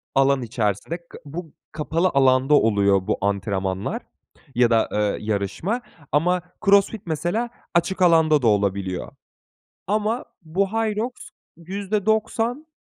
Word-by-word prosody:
alan 135 0 +4
içerisinde. 110 - -2
Ka - - -11
bu 160 +2 -7 0.2
kapalı 165 +3 0
alanda 135 +1 +4
oluyor 100 -7 +3
bu - - +1
antrenmanlar 95 -1 -1 0.5
ya 120 -1 +4
da, 115 -1 +3
eee, 105 -1 0
yarışma. 110 - -2 0.3
Ama 175 +5 +2 0.2
CrossFit 200 +1 +4
mesela 175 +9 -1 0.2
açık 180 +2 +1
alanda 160 -4 +5
da 120 - +2
olabiliyor. 100 -3 0 0.8
Ama 215 +4 0 0.2
bu, 180 +5 0
Hyrox 225 +1 0 0.5
%90 215 - -1
155 Hz, 110 wpm, -23 LUFS, -, 0.8 s, alanda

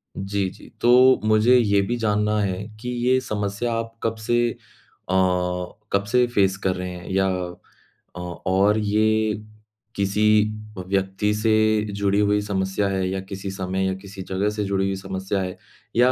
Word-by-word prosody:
जी, 100 0 -2
जी, - - -15
तो 125 +2 +6
मुझे 110 +4 +5
ये 100 -4 +3
भी 120 +5 -1
जानना 105 -1 +1
है, 95 0 -2 0.2
कि 125 - -5 0.2
ये 130 0 +4
समस्या 105 +2 -2
आप 115 0 -3
कब 115 0 0
से 120 0 +3
अ, - - -9 1.4
कब 100 0 +2
से 125 0 +4
फेस 95 -5 +2
कर 95 -1 +1
रहे 90 0 -4
हैं 90 +1 -9
या 95 0 +2 0.9
अ - - -7 0.3
और 100 +3 +3
ये 110 +1 +2 0.6
किसी 100 +1 0 0.5
अ, - - -3
व्यक्ति 95 +2 0
से 110 +1 +1 0.4
जुड़ी 100 0 +1
हुई 105 0 +2
समस्या 100 0 -1
है 95 -1 0
या 95 0 -2
किसी 95 0 -5
समय 95 0 -2
या 95 - 0
किसी 100 -1 -9
जगह 95 +2 0
से 105 0 -2
जुड़ी 95 0 0
हुई 95 0 -1
समस्या 95 0 -3
है, 90 -1 -4 0.4
या 125 +2 +5
100 Hz, 170 wpm, -23 LUFS, 95-110 Hz, 1.4 s, तो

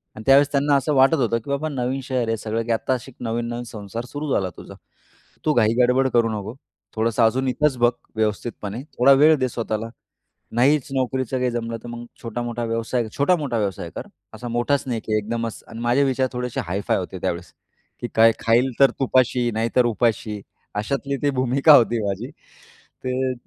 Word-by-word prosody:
आणि 110 - -9
त्यावेळेस 140 +1 +6
त्यांना 140 +1 +3
असं 140 +3 0
वाटत 135 +4 +5
होतं 120 -5 +1
की - - -8
बाबा 155 +3 -1
नवीन 130 0 -2
शहर 125 -3 -1
आहे 115 0 0
सगळं 110 +2 -2
की 115 - -2
आत्ता 115 +3 0
अशी 130 +1 -5
एक 120 - -12
नवीन-नवीन 120 +1 -3
संसार 115 +1 -7
सुरू 145 +2 -5
झाला 95 -2 0
तुझा. - - -11 0.7
तू 155 - +3
घाई 110 -3 +3
गडबड 130 +2 +3
करू 115 -1 +3
नको. 110 +2 -5 0.4
थोडंसं 115 +1 +1
अजून 130 +4 +2
इथंच 135 +1 +1
बघ, 120 0 +4 0.2
व्यवस्थितपणे. 110 +1 -2 0.2
थोडा 135 +3 +7
वेळ 155 +3 +6
दे 130 - +1
स्वतःला. 115 -1 -3 0.7
नाहीच 140 +3 +3
नोकरीचं 130 -1 -1
काही 125 0 +1
जमलं 115 -1 -3
तर - - -8
मग 120 0 -7 0.2
छोटा-मोठा 120 +1 -4
व्यवसाय 115 +1 -1
छोटा-मोठा 145 -5 +1
व्यवसाय 100 -4 -2
कर. - - -6 0.3
असा 120 - -7
मोठाच 120 +4 0
नाही 120 -3 -1
की 110 -1 +1
एकदमच 115 +1 -3
आणि 115 - -9
माझे 120 +4 +3
विचार 130 -1 +1
थोडेसे 125 -1 -3
हाय-फाय 95 +4 -1
होते 95 0 -5
त्यावेळेस. 85 0 -3 0.5
की 120 - -2
काय 115 0 +7
"खाईल 120 +3 +2
तर 135 -1 +6
तुपाशी 125 -2 +2
नाहीतर 115 +3 +1
उपाशी" 110 -3 0 0.3
अशातली 140 +6 -2
ती 145 - +3
भूमिका 135 +3 +4
होती 120 -1 +3
माझी. 100 +6 -3 0.7
ते. 130 0 -1
120 Hz, 180 wpm, -22 LUFS, 115-130 Hz, 0.7 s, थोडा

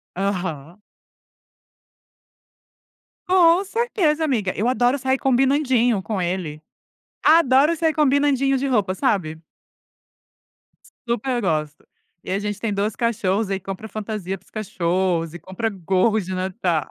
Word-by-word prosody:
Aham. 180 -4 -3 2.5
Com 360 0 +4
certeza, 375 -8 0
amiga. 220 -11 0
Eu 220 +5 0
adoro 250 +1 +2
sair 265 +1 +1
combinandinho 260 -4 +2
com 200 -2 -3
ele. 175 -4 -3 0.6
Adoro 305 0 +5
sair 320 0 +1
combinandinho 280 -2 +2
de 275 - -2
roupa, 210 -8 +1
sabe? 180 - -1 1.4
S - - -21 0.2
super 240 +1 -1
gosto. 155 -6 -2 0.4
E - - -6
a 195 - 0
gente 205 0 -4
tem 220 -3 -2
2 205 +1 -1
cachorros, 210 -3 0
aí 195 0 -1
compra 195 +3 -7
fantasia 210 -3 -5
para 185 - -29
os 185 - -26
cachorros 180 -5 -1
e 175 - -8
compra 190 +7 -3
gorros 195 +2 0
de 185 - -5
Natal. 185 -5 -1
210 Hz, 130 wpm, -22 LUFS, 185-265 Hz, 2.5 s, Adoro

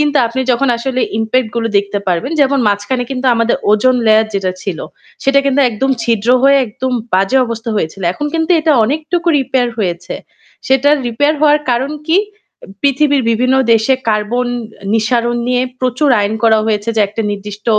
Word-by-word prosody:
হা - - +5
আপনি 235 +3 -4
যখন 255 +3 +1
আসলে 255 +1 -2 0.2
impact 225 +2 0
গুলো 230 -1 0
দেখতে 200 0 -2
পারবেন 180 - -1
যেমন 280 -1 +3
মাঝখানে 205 +5 -1
কিন্তু 260 0 -4
আমাদের 230 0 +1
ozone 245 +4 +3
layer 220 0 +4
যেটা 190 -2 -1
ছিল, 185 -5 -4 0.4
সেটা 275 +1 +3
কিন্তু 275 +1 +1
একদম 240 +4 -2
ছিদ্র 230 -2 -1 0.2
হয়ে 275 0 +5
একদম 255 +4 -5 0.2
বাজে 195 +8 +2
অবস্থা 230 0 -5
হয়েছিল। 195 0 -3
এখন 295 - -4
কিন্তু 325 +2 0
এটা 310 0 +1
অনেকটুকু 315 +7 -2
repair 260 -2 0
হয়েছে। 180 -5 -3 0.5
সেটা 265 +2 +3 0.2
repair 290 +6 +1
হওয়ার 300 0 +4
কারণ 265 +5 -1 0.2
কি? 340 - +4 0.5
এ - - -12 0.2
পৃথিবীর 280 0 +2
বিভিন্ন 255 +3 +1 0.2
দেশে 225 +4 +2 0.2
carbon 220 +4 -1 0.4
আ - - -9
নিঃসরণ 235 +2 0
নিয়ে 250 0 +1 0.2
প্রচুর 255 +3 0
আইন 205 +2 -1
করা 220 -1 +4
হয়েছে 210 0 -1
যে 220 - +3
একটা 215 +3 -4
নির্দিষ্ট 205 +1 -8
240 Hz, 170 wpm, -14 LUFS, 215-270 Hz, 0.5 s, হা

